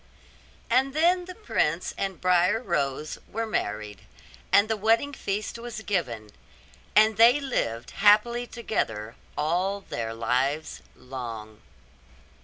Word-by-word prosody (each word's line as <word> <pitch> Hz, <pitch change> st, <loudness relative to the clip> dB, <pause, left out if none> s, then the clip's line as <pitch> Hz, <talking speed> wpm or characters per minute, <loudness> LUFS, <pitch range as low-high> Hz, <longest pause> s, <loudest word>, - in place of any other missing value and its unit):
And 265 Hz, +3 st, +2 dB
then 350 Hz, +3 st, +3 dB
the 365 Hz, 0 st, -9 dB
prince 175 Hz, -, -1 dB
and 195 Hz, -2 st, -3 dB
Briar 180 Hz, +3 st, +3 dB
Rose 155 Hz, -, -2 dB
were 225 Hz, +1 st, -2 dB
married, 105 Hz, -, -3 dB, 0.5 s
and 200 Hz, +2 st, +6 dB
the 220 Hz, -, 0 dB
wedding 225 Hz, +7 st, +2 dB
feast 210 Hz, -1 st, -3 dB
was 230 Hz, -2 st, -7 dB
given; 120 Hz, -, -2 dB, 0.6 s
and 215 Hz, 0 st, +5 dB
they 235 Hz, +5 st, +7 dB
lived 120 Hz, -, -2 dB
happily 215 Hz, +4 st, +4 dB
together 115 Hz, -, -3 dB, 0.2 s
all 180 Hz, +6 st, 0 dB
their 115 Hz, -9 st, -5 dB
lives 130 Hz, +7 st, -1 dB
long. 115 Hz, -4 st, -8 dB
195 Hz, 115 wpm, -26 LUFS, -, 0.6 s, they